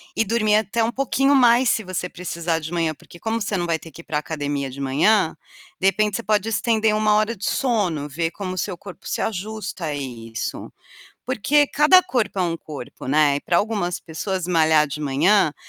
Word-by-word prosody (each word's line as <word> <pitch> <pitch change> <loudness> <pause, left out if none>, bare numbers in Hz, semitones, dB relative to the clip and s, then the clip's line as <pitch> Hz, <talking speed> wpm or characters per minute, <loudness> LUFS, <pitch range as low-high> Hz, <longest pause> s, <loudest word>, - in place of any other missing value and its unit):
e - - +2
dormir 215 -1 +2
até 220 +1 +1
um 230 - 0
pouquinho 275 +2 +1
mais 245 -1 +5
se 220 - +1
você 180 -1 -3
precisar 170 -2 -3
de 160 +2 -7
manhã, 165 -2 0
porque 170 +3 -16
como 225 0 -2
você 205 0 -1
não 175 - -1
vai 165 -1 0
ter 165 - -12
que 170 - -11
ir - - -21
para 150 - -2
academia 145 -2 -3
de 135 +2 -10
manhã, 160 +7 +2 0.4
de 195 - +2
repente 210 +2 +2
você 235 - -3
pode 210 0 +1
estender 220 0 +1
1 215 0 +3
hora 215 +2 +1
de 200 - -6
sono, 195 - 0
ver 165 +4 -2
como 185 -2 -5
o - - -7
seu 180 -1 -3
corpo 195 -3 -11
se - - -2
ajusta 215 -3 -4
a 150 -2 -2
isso. 115 -5 -6 0.5
Porque 280 +4 +2
cada 305 +6 +6
corpo 215 -6 -1
é - - +3
um 170 -1 -1
corpo, 145 -5 -9
né, 145 0 +3
e - - -7
para 170 - +1
algumas 200 -4 -1
pessoas, 180 +2 -4
malhar 160 -3 +4
de 140 +2 -6
manhã, 155 +4 +3
185 Hz, 210 wpm, -22 LUFS, 155-220 Hz, 0.5 s, cada